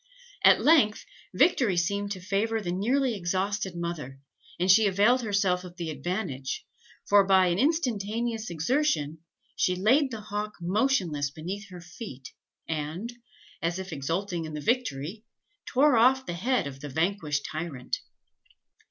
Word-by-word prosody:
At - - +6
length, 280 -9 +4 0.3
victory 240 - +3
seemed 200 +4 0
to 185 - -8
favour 205 +4 0
the 180 -5 -3
nearly 245 +8 +1
exhausted 190 +1 -2
mother, 160 -6 -5 0.4
and 185 +2 +4
she 215 +2 +6
availed 210 +7 +3
herself 195 -4 +1
of 175 -1 -10
the 170 -3 -3
advantage; 140 -3 -4 0.4
for, 205 0 +6
by 190 -1 +4
an 175 +2 0
instantaneous 230 - 0
exertion, 165 - 0 0.4
she 180 - +1
laid 255 +10 +3
the 225 -4 -6
hawk 210 0 -4
motionless 175 - +1
beneath 185 +8 -7
her 180 -1 -10
feet, 170 - -9 0.4
and, 160 +9 -4 0.5
as 170 +2 -1
if 190 -2 -6
exulting 165 +4 -2
in 155 -1 -6
the - - -3
victory, 210 - -1 0.4
tore 280 +1 +4
off 260 +3 +4
the 175 - -4
head 240 - 0
of 135 -1 -7
the 145 +1 -7
vanquished 160 -1 -1
tyrant. 155 -5 -4
190 Hz, 145 wpm, -27 LUFS, 165-220 Hz, 0.5 s, At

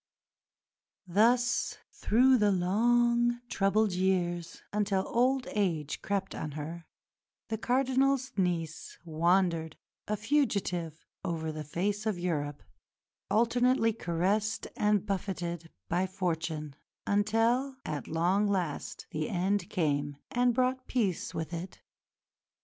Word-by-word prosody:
Thus, 235 +6 +2
through 255 +4 +4
the 210 -1 +4
long, 240 +6 +3
troubled 205 +1 +2
years, 175 -2 -1
until 200 -2 +1
old 255 +2 +2
age 165 -8 -1
crept 195 -1 -2
on 150 -2 -5
her, 160 +3 -6 0.6
the 220 -1 -2
Cardinal's 265 +2 +2
niece 170 -4 -2
wandered, 165 0 +1 0.3
a 210 - -1
fugitive, 200 - 0 0.2
over 165 -3 -2
the 155 0 -5
face 200 +8 -2
of 210 -4 0
Europe, 150 -5 -2 0.7
alternately 235 +1 +3
caressed 200 +3 0
and 210 -1 +2
buffeted 175 -4 -3 0.2
by 180 +2 +1
fortune, 160 -5 -3 0.3
until 225 +6 +2
"at 150 - -4
long 180 +6 +2
last" 180 -7 -2
the 155 0 -2
end 195 +3 0
came 145 -5 0
and 245 -1 +2
brought 255 0 0
peace 205 -9 -1
with 160 +1 -4
it. 175 +2 -6
195 Hz, 110 wpm, -30 LUFS, 170-225 Hz, 0.7 s, through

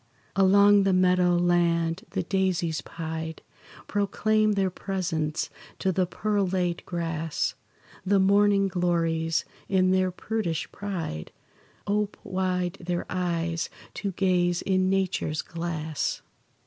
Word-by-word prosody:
Along 200 +1 +6
the 195 -1 +2
meadow 180 -1 +4
land 175 +2 +1
the 190 - -2
daisies 180 -3 0
pied 160 -1 -6 0.4
Proclaim 215 +1 +1
their 195 -2 +1
presence 170 -5 -2 0.3
to 190 - +1
the 185 0 +1
pearl 205 +1 0
laid 180 -2 -1
grass; 165 -2 -2 0.5
The 195 +1 +3
morning 200 +1 +4
glories, 165 -3 0 0.2
in 185 -1 +3
their 185 0 +3
prudish 180 -3 -3
pride, 170 - -5 0.5
Ope 205 0 0
wide 185 -1 -1
their 175 0 -2
eyes, 170 -2 -1 0.2
to 200 -2 -3
gaze 175 -2 +1
in 185 -1 +2
nature's 185 -5 0
glass. 160 -2 -3
180 Hz, 110 wpm, -27 LUFS, 170-195 Hz, 0.5 s, Along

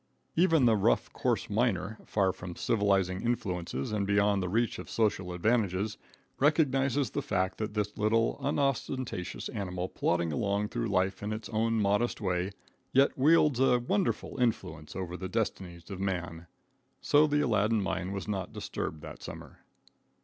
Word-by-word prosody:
Even 165 -5 +4
the 115 -2 +5
rough, 105 +3 +1
coarse 120 -4 0
miner, 105 -2 0
far 95 -3 +2
from 90 -1 -8
civilizing 95 -4 +1
influences 90 - -2
and 100 -2 -1
beyond 100 0 +3
the 90 - -2
reach 115 +4 0
of - - -8
social 100 -5 0
advantages, 105 +1 0 0.4
recognizes 140 -3 +2
the 145 - -1
fact 95 -9 -1
that 110 -1 -3
this 105 0 -1
Little, 110 +2 +1
unostentatious 135 -8 -2
animal 90 -2 -3
plodding 85 -2 0
along 100 +5 0
through - - -2
life 95 -1 0
in 105 +1 -3
its 110 0 -5
own 115 +1 +1
modest 105 +4 +1
way, 90 -2 0 0.4
yet 135 +2 +4
wields 150 -1 +4
a 130 -2 +5
wonderful 185 +9 -1
influence 80 -10 -1
over 90 -1 -4
the 95 0 -5
destinies 95 -5 -3
of 95 - -5
man. 90 -3 -3 0.5
So 150 +1 +4
the 145 0 +2
Aladdin 110 -4 +2
mine 95 -1 -2
was 100 0 -4
not 95 -3 -3
disturbed 75 -1 -5
that - - -9
summer. - - -9
105 Hz, 155 wpm, -30 LUFS, 95-120 Hz, 0.5 s, the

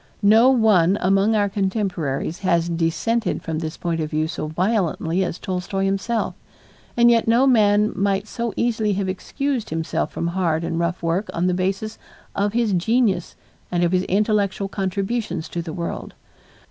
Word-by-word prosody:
No 220 +5 +6
one 205 -7 +4
among 195 +4 +2
our 205 -1 +2
contemporaries 190 -7 -2
has 175 -3 +1
dissented 175 +6 -1
from 160 -1 -3
this 160 -1 -5
point 170 -2 -2
of 155 - -3
view 155 0 0
so 160 - -4
violently 180 0 0
as 180 - -3
Tolstoy 190 +1 -3
himself, 195 +4 -1 0.6
and 240 0 +6
yet 230 -1 +2
no 235 +4 +4
man 210 -4 +4
might 200 +1 0
so 235 +1 -3
easily 220 -3 +1
have 195 0 -1
excused 255 +6 -3
himself 160 0 -2
from 170 - -2
hard 170 -3 0
and 165 0 -2
rough 170 +1 -2
work 170 +5 -1
on 170 - 0
the 180 - +2
basis 195 +4 -2 0.4
of 205 +1 0
his 230 -3 +1
genius 195 -1 +1 0.4
and 175 -1 +1
of 170 - +2
his 185 -1 +2
intellectual 200 -1 +1
contributions 195 -2 -2
to 170 - -3
the 165 -1 -6
world. 170 +1 -5
195 Hz, 165 wpm, -22 LUFS, 170-215 Hz, 0.6 s, No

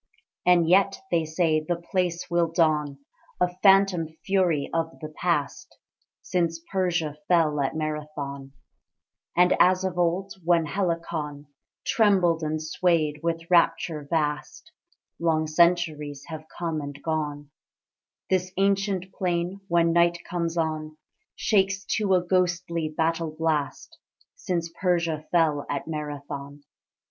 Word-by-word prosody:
And 175 -2 +5
yet 195 +3 +4
(they 165 -2 +2
say) 160 0 +1
the 170 +3 -2
place 175 0 -2
will 170 -1 +1
don 150 -4 +1 0.4
A 180 0 +1
phantom 195 -4 +5 0.2
fury 180 -7 +2
of 165 0 -2
the 155 - -6
past, 155 -2 -2 0.5
Since 170 -2 0
Persia 175 -6 0
fell 160 -4 +3
at 135 +2 -1
Marathon; 150 -3 -5 0.8
And 180 0 +5
as 185 +1 +4
of 180 -2 -2
old, 180 +3 0
when 170 -1 +3
Helicon 165 -4 -3 0.4
Trembled 185 -7 +3
and 155 0 -1
swayed 155 -1 0
with 165 0 -2
rapture 165 -3 +2
vast 150 - -2 0.5
(Long 160 -2 +1
centuries 155 -3 +1
have 155 -1 -7
come 165 -3 -2
and 145 0 -7
gone), 150 -2 -3 0.8
This 185 -1 0
ancient 195 -1 0
plain, 180 +1 -2
when 170 -1 +3
night 170 0 +4
comes 170 -1 -2
on, 155 -1 -2 0.4
Shakes 195 -1 +1
to 200 -3 +2
a 180 - +2
ghostly 175 -3 0
battle 160 0 -1
blast, 155 -3 -2 0.4
Since 170 - -3
Persia 170 -4 0
fell 155 -4 +2
at 140 +1 -3
Marathon. 145 -2 -6
165 Hz, 120 wpm, -26 LUFS, 155-180 Hz, 0.8 s, And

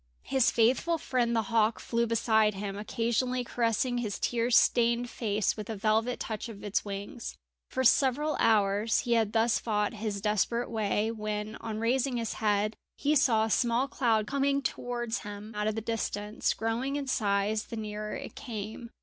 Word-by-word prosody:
His 265 -2 +3
faithful 260 +9 +2
friend 245 -5 0
the 225 - +2
hawk 225 -1 +2
flew 235 0 0
beside 220 -2 +2
him, 195 0 -4
occasionally 235 +4 -1
caressing 240 +1 0
his 215 -4 -3
tear 235 0 0
stained 235 0 +3
face 215 -3 0
with 215 -2 -6
the 225 - -4
velvet 220 +4 +1
touch 220 +1 -4
of 205 -3 -10
its 205 -1 0
wings. 205 +5 -6 0.3
For 260 - -1
several 280 +4 +3
hours 210 0 +3
he 240 - 0
had 225 -3 +2
thus 225 0 +3
fought 210 -2 0
his 210 -2 -3
desperate 215 +4 0
way, 215 0 0
when, 215 -1 -4
on 220 -2 -5
raising 245 +3 +1
his 230 -1 -2
head, 210 0 +2 0.2
he 295 +2 +1
saw 230 -6 +4
a 220 - -3
small 240 +3 +2
cloud 230 -6 +1
coming 280 +2 +1
towards 240 -2 -2
him 205 +2 -8
out 210 0 -1
of 215 - 0
the 225 - -2
distance, 215 -1 -2
growing 235 +5 -1
in 285 -1 -2
size 210 -3 0
the 230 - -7
nearer 210 0 -4
it - - -7
came. 225 -2 -6
225 Hz, 175 wpm, -29 LUFS, 210-240 Hz, 0.3 s, saw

